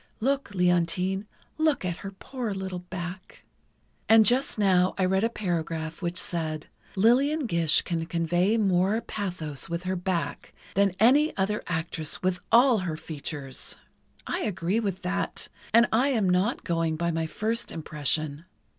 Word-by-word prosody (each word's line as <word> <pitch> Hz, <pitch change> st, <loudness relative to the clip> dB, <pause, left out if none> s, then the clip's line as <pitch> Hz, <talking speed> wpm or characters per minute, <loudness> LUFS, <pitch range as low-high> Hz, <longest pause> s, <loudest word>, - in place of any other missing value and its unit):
(Look, 270 Hz, -3 st, -1 dB
Leontine, 180 Hz, +2 st, +1 dB, 0.3 s
look 310 Hz, -10 st, +2 dB
at 175 Hz, -1 st, -2 dB
her 195 Hz, -, -6 dB
poor 220 Hz, +2 st, -5 dB
little 190 Hz, -1 st, -4 dB
back!) 180 Hz, +1 st, -8 dB, 0.7 s
And 220 Hz, -1 st, +8 dB
just 250 Hz, +5 st, +2 dB
now 185 Hz, -3 st, +3 dB
I 190 Hz, -, +2 dB
read 190 Hz, +2 st, +2 dB
a 230 Hz, -, +3 dB
paragraph 165 Hz, -5 st, -3 dB
which 175 Hz, 0 st, -2 dB
said: 160 Hz, -4 st, -2 dB, 0.3 s
"Lillian 265 Hz, +9 st, +3 dB
Gish 170 Hz, -7 st, +2 dB
can 165 Hz, -1 st, -2 dB
convey 175 Hz, +5 st, +1 dB
more 195 Hz, 0 st, +2 dB
pathos 175 Hz, -12 st, -5 dB
with 170 Hz, +1 st, -3 dB
her 185 Hz, +1 st, -1 dB
back 180 Hz, -1 st, -3 dB, 0.2 s
than 200 Hz, -1 st, +3 dB
any 280 Hz, +8 st, +4 dB
other 205 Hz, +2 st, 0 dB
actress 160 Hz, -2 st, -2 dB
with 180 Hz, -1 st, +1 dB
all 240 Hz, -1 st, +6 dB
her 170 Hz, -4 st, -3 dB
features." 145 Hz, -4 st, -6 dB, 0.5 s
I -, -, -2 dB
agree 185 Hz, +1 st, 0 dB
with 195 Hz, -4 st, -3 dB
that, 185 Hz, +2 st, -2 dB, 0.2 s
and 230 Hz, +2 st, +6 dB
I 245 Hz, +5 st, +3 dB
am 225 Hz, -8 st, +2 dB
not 185 Hz, +6 st, +1 dB
going 165 Hz, -2 st, 0 dB
by 170 Hz, +2 st, 0 dB
my 165 Hz, 0 st, -1 dB
first 225 Hz, +7 st, -2 dB
impression. 155 Hz, 0 st, -2 dB
185 Hz, 150 wpm, -27 LUFS, 170-215 Hz, 0.7 s, And